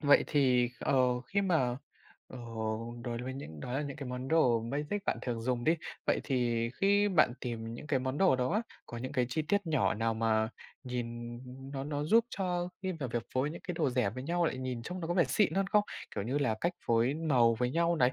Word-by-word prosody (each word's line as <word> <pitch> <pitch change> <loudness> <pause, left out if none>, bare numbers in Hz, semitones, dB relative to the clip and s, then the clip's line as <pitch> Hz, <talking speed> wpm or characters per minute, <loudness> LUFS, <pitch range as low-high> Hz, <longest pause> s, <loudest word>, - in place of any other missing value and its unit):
Vậy 145 -2 +5
thì, 125 -4 +3
ờ, 125 -2 +2
khi 195 +10 -1
mà, 135 -10 +2 0.5
ờ, 130 - -9 0.6
đối 120 -1 -3
với 130 +1 -4
những 80 - -8
đó 125 - -5
là 135 +3 0
những 140 -2 -5
cái 140 -4 -6
món 125 +1 -4
đồ 130 -8 +4
basic 145 - -3
bạn - - 0
thường 120 -3 -2
dùng 120 -1 -1
đi, 165 +2 +4 0.3
vậy - - +2
thì 120 -3 +1
khi 200 +1 +3
bạn 170 -10 +4
tìm 115 -1 -4
những 150 - -8
cái 135 -4 +2
món 130 +2 -2
đồ 185 -9 +5
đó 125 0 0
á, 215 +3 +2 0.2
có 120 - -6
những 130 +2 -5
cái 125 -1 +1
chi 155 +5 -1
tiết 200 +4 0
nhỏ 160 -2 +2
nào 115 +2 0
mà 110 -1 +2 0.4
nhìn 120 -1 -4 0.3
nó 135 -1 -3
nó 145 0 -2
giúp 225 +8 +5
cho 180 -2 -1
khi 190 -1 -1
mà 130 - -1
việc 120 0 -2
phối 130 +3 +1
những 170 - -7
cái 180 - -1
đồ 140 - +1
rẻ 125 -5 +1
với 130 +4 -6
nhau, 170 +4 +1
lại 130 - 0
nhìn 130 -2 -3
trông 180 +7 -5
nó 165 - -3
có 175 - -1
vẻ 175 -3 +5
xịn 160 +10 +2
hơn 195 0 +2
không? 205 +1 +3 0.3
Kiểu 100 -1 -2
như 130 +5 0
là 130 -6 +1
cách 175 - +1
phối 115 +3 +3
màu 130 -8 +3
với 125 0 +1
nhau 170 +3 +2
này, 125 -3 +4
130 Hz, 240 wpm, -32 LUFS, 120-165 Hz, 0.6 s, Vậy